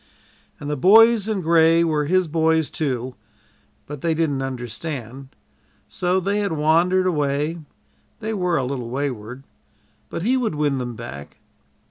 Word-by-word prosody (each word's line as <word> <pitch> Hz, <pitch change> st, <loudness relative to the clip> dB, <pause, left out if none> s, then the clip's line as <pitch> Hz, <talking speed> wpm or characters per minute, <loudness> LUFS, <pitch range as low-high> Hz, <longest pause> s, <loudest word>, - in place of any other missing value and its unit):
And 145 Hz, -, -7 dB
"the 150 Hz, -, -1 dB
Boys 220 Hz, -, +5 dB
in 215 Hz, -3 st, -1 dB
Gray" 165 Hz, 0 st, +4 dB
were 155 Hz, -3 st, 0 dB
his 185 Hz, +3 st, +2 dB
"boys," 160 Hz, 0 st, +1 dB
too, 130 Hz, -5 st, -3 dB, 0.7 s
but 145 Hz, -2 st, -8 dB
they 165 Hz, -1 st, 0 dB
didn't 150 Hz, -4 st, 0 dB
understand, 130 Hz, 0 st, -6 dB, 0.6 s
so 180 Hz, +1 st, 0 dB
they 200 Hz, +3 st, -1 dB
had 200 Hz, -5 st, -1 dB
wandered 170 Hz, +5 st, +2 dB
away 150 Hz, -1 st, -1 dB, 0.6 s
they 220 Hz, 0 st, -3 dB
were 180 Hz, -4 st, 0 dB
a 135 Hz, -, 0 dB
little 125 Hz, -3 st, -4 dB
wayward, 125 Hz, -2 st, -4 dB, 0.7 s
but 165 Hz, -, -5 dB
he 250 Hz, +5 st, +2 dB
would 230 Hz, -10 st, -1 dB
win 145 Hz, -3 st, 0 dB
them 120 Hz, -2 st, -5 dB
back. 105 Hz, -11 st, -9 dB
155 Hz, 145 wpm, -22 LUFS, 135-180 Hz, 0.7 s, Boys